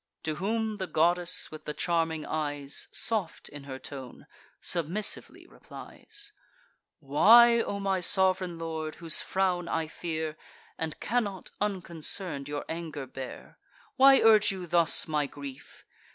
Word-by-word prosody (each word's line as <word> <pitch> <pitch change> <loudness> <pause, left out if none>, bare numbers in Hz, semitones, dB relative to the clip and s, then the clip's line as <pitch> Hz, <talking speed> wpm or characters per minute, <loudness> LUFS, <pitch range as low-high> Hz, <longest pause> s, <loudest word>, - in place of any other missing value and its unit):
To 155 -1 -3
whom 220 +3 -1
the 190 -2 -4
goddess 175 +2 +1
with 155 - -10
the 150 - -5
charming 165 -2 0
eyes, 145 -2 -2
Soft 210 -8 -1
in 145 -1 -10
her 135 -2 -6
tone, 130 -1 -9 0.3
submissively 175 +5 0
replies: 415 -1 -8 0.7
"Why, 230 +12 +6
O 200 - -3
my 195 -1 0
sov'reign 185 -1 +2
lord, 160 -1 -4
whose 165 -2 +3
frown 185 -2 0
I 160 - -1
fear, 160 -1 -4 0.4
And 160 -2 -5
cannot, 205 -5 -2
unconcern'd, 170 -6 -2
your 145 0 -4
anger 160 -4 -5
bear; 130 0 -9 0.4
Why 270 +1 +7
urge 215 -2 +5
you 185 -2 -6
thus 170 -2 +3
my 150 -2 0
grief? 140 -1 -11
170 Hz, 130 wpm, -29 LUFS, 150-195 Hz, 0.7 s, Why